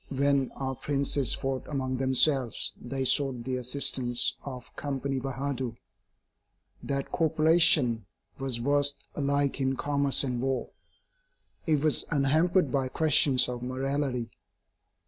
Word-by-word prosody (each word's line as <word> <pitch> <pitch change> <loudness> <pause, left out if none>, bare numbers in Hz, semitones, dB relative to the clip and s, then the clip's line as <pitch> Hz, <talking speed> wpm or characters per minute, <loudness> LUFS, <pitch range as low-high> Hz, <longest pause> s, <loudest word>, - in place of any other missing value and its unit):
When 140 -1 +1
our 135 -1 -3
princes 140 -1 -1
fought 135 -1 -4
among 130 -3 -3
themselves, 130 -1 +1
they 130 +2 -4
sought 130 -1 +2
the 130 +1 -2
assistance 125 -1 +1
of 130 -3 -9
Company 135 -1 -3
Bahadur. 130 -2 -4 1.0
That 140 -1 -4
corporation 160 - +3 0.3
was 135 -3 -1
versed 145 +3 0
alike 140 -1 0
in 135 0 0
commerce 140 0 +2
and 125 -3 -2
war. 130 -2 -2 1.0
It 155 -3 +2
was 155 -2 +3
unhampered 155 +3 +2
by 135 -1 0
questions 145 -3 +4
of 125 -1 -5
morality. 130 -1 -2
135 Hz, 115 wpm, -28 LUFS, 130-145 Hz, 1.0 s, questions